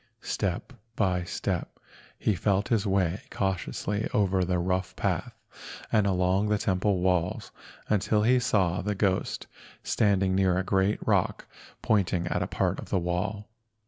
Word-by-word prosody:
Step 95 Hz, +5 st, -2 dB, 0.2 s
by 90 Hz, -2 st, +1 dB
step 90 Hz, -, -3 dB, 0.4 s
he 105 Hz, -, +1 dB
felt 100 Hz, +3 st, 0 dB
his 110 Hz, -4 st, +1 dB
way 95 Hz, -1 st, +1 dB
cautiously 100 Hz, +2 st, -2 dB
over 95 Hz, -2 st, +2 dB
the 90 Hz, 0 st, 0 dB
rough 90 Hz, +1 st, -1 dB
path -, -, -2 dB, 0.6 s
and 105 Hz, -3 st, +3 dB
along 95 Hz, +2 st, +2 dB
the 105 Hz, -, +3 dB
temple 95 Hz, -1 st, +1 dB
walls 90 Hz, -1 st, 0 dB, 0.4 s
until 105 Hz, 0 st, +2 dB
he 125 Hz, +3 st, +4 dB
saw 95 Hz, -8 st, +1 dB
the 105 Hz, +1 st, -2 dB
ghost 95 Hz, -1 st, 0 dB, 0.4 s
standing 100 Hz, -3 st, +2 dB
near 95 Hz, -1 st, +2 dB
a 95 Hz, -, +1 dB
great 95 Hz, +2 st, +1 dB
rock -, -, +1 dB, 0.4 s
pointing 90 Hz, -5 st, +1 dB
at -, -, -1 dB
a -, -, -1 dB
part -, -, -1 dB
of -, -, -8 dB
the -, -, +1 dB
wall. 95 Hz, +4 st, -2 dB
95 Hz, 145 wpm, -28 LUFS, 90-105 Hz, 0.6 s, he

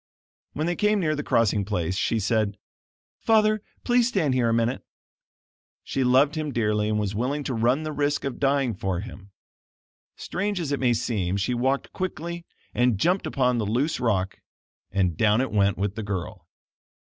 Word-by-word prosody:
When 155 Hz, -, -2 dB
they 175 Hz, +1 st, 0 dB
came 210 Hz, +3 st, +2 dB
near 155 Hz, -4 st, +1 dB
the 150 Hz, -, -2 dB
crossing 110 Hz, -6 st, +2 dB
place, 90 Hz, -3 st, -2 dB
she 110 Hz, +3 st, 0 dB
said: 105 Hz, -1 st, 0 dB, 0.6 s
"Father, 215 Hz, -1 st, +3 dB, 0.2 s
please 245 Hz, -1 st, +3 dB
stand 175 Hz, -, +1 dB
here 125 Hz, -2 st, +2 dB
a -, -, +2 dB
minute." 115 Hz, +2 st, 0 dB, 1.0 s
She 135 Hz, -, -1 dB
loved 130 Hz, +4 st, +4 dB
him 155 Hz, -2 st, -3 dB
dearly 105 Hz, -3 st, 0 dB
and 105 Hz, -, 0 dB
was 105 Hz, -1 st, -1 dB
willing 130 Hz, +7 st, -1 dB
to 135 Hz, -, -3 dB
run 125 Hz, +6 st, +1 dB
the 155 Hz, -, -3 dB
risk 145 Hz, -1 st, 0 dB
of 135 Hz, -2 st, -4 dB
dying 135 Hz, -3 st, +2 dB
for 95 Hz, -2 st, -2 dB
him. 100 Hz, -3 st, -10 dB, 0.9 s
Strange 200 Hz, +1 st, -3 dB
as 155 Hz, -5 st, -3 dB
it 140 Hz, -, 0 dB
may 125 Hz, -2 st, +3 dB
seem 100 Hz, -5 st, -1 dB
she 100 Hz, +5 st, 0 dB
walked 130 Hz, +3 st, -1 dB
quickly 170 Hz, -2 st, -4 dB, 0.3 s
and 125 Hz, -3 st, +2 dB
jumped 180 Hz, -, +1 dB
upon 125 Hz, -3 st, +1 dB
the 110 Hz, -, -1 dB
loose 130 Hz, +9 st, 0 dB
rock, 100 Hz, -7 st, 0 dB, 0.5 s
and 90 Hz, -4 st, 0 dB
down 105 Hz, 0 st, +3 dB
it 130 Hz, -, -1 dB
went 100 Hz, -2 st, +2 dB
with 100 Hz, +1 st, -1 dB
the 110 Hz, -, -5 dB
girl. 100 Hz, -4 st, -5 dB
125 Hz, 180 wpm, -25 LUFS, 105-150 Hz, 1.0 s, loved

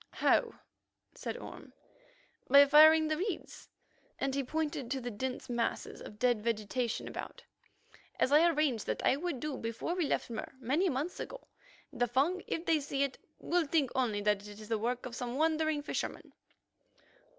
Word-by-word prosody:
"How?" -, -, +2 dB, 0.6 s
asked -, -, -5 dB
Orme. -, -, -10 dB, 0.8 s
"By 280 Hz, +2 st, +9 dB
firing 310 Hz, +2 st, +7 dB
the 310 Hz, 0 st, 0 dB
reeds"—and 330 Hz, -6 st, -6 dB
he 275 Hz, 0 st, 0 dB
pointed 290 Hz, -3 st, -3 dB
to 270 Hz, +1 st, -1 dB
the 245 Hz, -1 st, -5 dB
dense 255 Hz, +4 st, -4 dB
masses 235 Hz, -1 st, -2 dB
of 210 Hz, -, -10 dB
dead 240 Hz, -2 st, +2 dB
vegetation 230 Hz, +2 st, -2 dB
about—"as 260 Hz, -, -7 dB
I 315 Hz, +4 st, +6 dB
arranged 295 Hz, -9 st, 0 dB
that -, -, -2 dB
I -, -, +4 dB
would 310 Hz, -2 st, -3 dB
do 300 Hz, -1 st, -3 dB
before 230 Hz, +9 st, -3 dB
we 355 Hz, -4 st, 0 dB
left -, -, -1 dB
Mur 225 Hz, -, -5 dB
many 285 Hz, +10 st, +1 dB
months 290 Hz, +6 st, -3 dB
ago. -, -, -7 dB, 0.5 s
The 245 Hz, -, +1 dB
Fung, 290 Hz, +10 st, +1 dB
if 330 Hz, -, -3 dB
they 320 Hz, -2 st, +3 dB
see 280 Hz, -1 st, -1 dB
it, 275 Hz, -2 st, -3 dB, 0.2 s
will 345 Hz, -3 st, 0 dB
think 280 Hz, -4 st, +1 dB
only 235 Hz, -6 st, 0 dB
that 205 Hz, 0 st, 0 dB
it 205 Hz, 0 st, -11 dB
is 215 Hz, 0 st, -11 dB
the 225 Hz, -2 st, 0 dB
work 245 Hz, +3 st, -2 dB
of 250 Hz, -, -6 dB
some 245 Hz, 0 st, -4 dB
wandering 315 Hz, 0 st, +1 dB
fisherman." -, -, -4 dB
275 Hz, 165 wpm, -32 LUFS, 240-315 Hz, 0.8 s, By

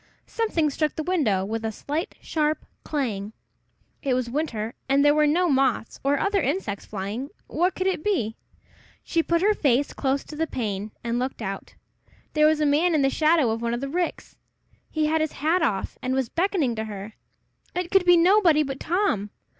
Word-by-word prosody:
Something 340 Hz, -10 st, 0 dB
struck 305 Hz, +2 st, -1 dB
the 315 Hz, -, -3 dB
window 270 Hz, -, +1 dB
with 225 Hz, +2 st, -3 dB
a 220 Hz, -, -1 dB
slight, 300 Hz, -, -4 dB
sharp 305 Hz, -1 st, -1 dB, 0.2 s
clang. 220 Hz, -8 st, -3 dB, 0.7 s
It 265 Hz, -3 st, +1 dB
was 250 Hz, -2 st, -2 dB
winter, 235 Hz, -6 st, -2 dB, 0.2 s
and 280 Hz, +1 st, +4 dB
there 290 Hz, -, +6 dB
were 300 Hz, 0 st, +4 dB
no 350 Hz, +5 st, +3 dB
moths 265 Hz, -6 st, +1 dB
or 280 Hz, +1 st, +2 dB
other 400 Hz, +5 st, +1 dB
insects 270 Hz, -, -2 dB
flying, 210 Hz, +7 st, -4 dB, 0.2 s
What 360 Hz, +2 st, 0 dB
could 370 Hz, -, -2 dB
it 375 Hz, -5 st, 0 dB
be? 235 Hz, -, 0 dB, 0.7 s
She 335 Hz, -, +1 dB
put 335 Hz, +2 st, +1 dB
her 425 Hz, +1 st, +5 dB
face 280 Hz, -6 st, +1 dB
close 270 Hz, 0 st, 0 dB
to 305 Hz, -, -10 dB
the 325 Hz, +2 st, -1 dB
pane, 210 Hz, -6 st, -3 dB
and 235 Hz, 0 st, -1 dB
looked 255 Hz, +1 st, -3 dB
out. 195 Hz, 0 st, -6 dB, 0.6 s
There 305 Hz, 0 st, +5 dB
was 310 Hz, 0 st, +2 dB
a 305 Hz, -, +2 dB
man 315 Hz, +4 st, +3 dB
in 290 Hz, -, +3 dB
the 270 Hz, -, +3 dB
shadow 310 Hz, -6 st, +3 dB
of 225 Hz, +1 st, -2 dB
one 235 Hz, 0 st, 0 dB
of -, -, -4 dB
the 275 Hz, -, -3 dB
ricks! 350 Hz, +3 st, -3 dB, 0.5 s
He 310 Hz, -1 st, 0 dB
had 315 Hz, +1 st, +2 dB
his 315 Hz, -, -1 dB
hat 325 Hz, +5 st, +1 dB
off, 200 Hz, -12 st, -1 dB
and 255 Hz, +1 st, -1 dB
was 265 Hz, -3 st, 0 dB
beckoning 340 Hz, -, +1 dB
to 220 Hz, -, -2 dB
her. 210 Hz, 0 st, -7 dB, 0.6 s
It 355 Hz, -1 st, -2 dB
could 390 Hz, -1 st, +5 dB
be 355 Hz, -1 st, +7 dB
nobody 340 Hz, -3 st, +5 dB
but 270 Hz, -1 st, -5 dB
Tom! 340 Hz, -, 0 dB
290 Hz, 195 wpm, -25 LUFS, 235-330 Hz, 0.7 s, be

